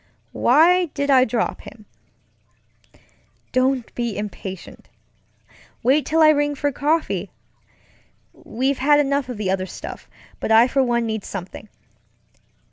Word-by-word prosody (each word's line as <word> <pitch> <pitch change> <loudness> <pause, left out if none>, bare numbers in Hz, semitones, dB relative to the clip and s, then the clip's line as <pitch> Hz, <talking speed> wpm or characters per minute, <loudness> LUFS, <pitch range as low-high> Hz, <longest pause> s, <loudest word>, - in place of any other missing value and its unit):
Why 340 +8 +4
did 280 0 0
I 260 -1 +5
drop 225 -1 -2
him? 215 0 -14 1.7
Don't 255 -1 0
be 235 -3 -3
impatient. 195 -3 -8 0.9
Wait 275 +5 +2
till 320 +1 +3
I 310 - +7
ring 290 -1 +1
for 285 +1 -1
coffee. 305 +4 -1 1.0
We've 265 +4 -3
had 290 +2 +4
enough 280 -2 0
of 245 - -5
the 200 -3 -2
other 190 -1 -2
stuff, - - -9 0.3
but - - -3
I 225 +2 +6
for 270 +1 +1
one 240 -2 0
need 220 -2 -3
something. 195 +2 -8
255 Hz, 125 wpm, -21 LUFS, 220-290 Hz, 1.7 s, I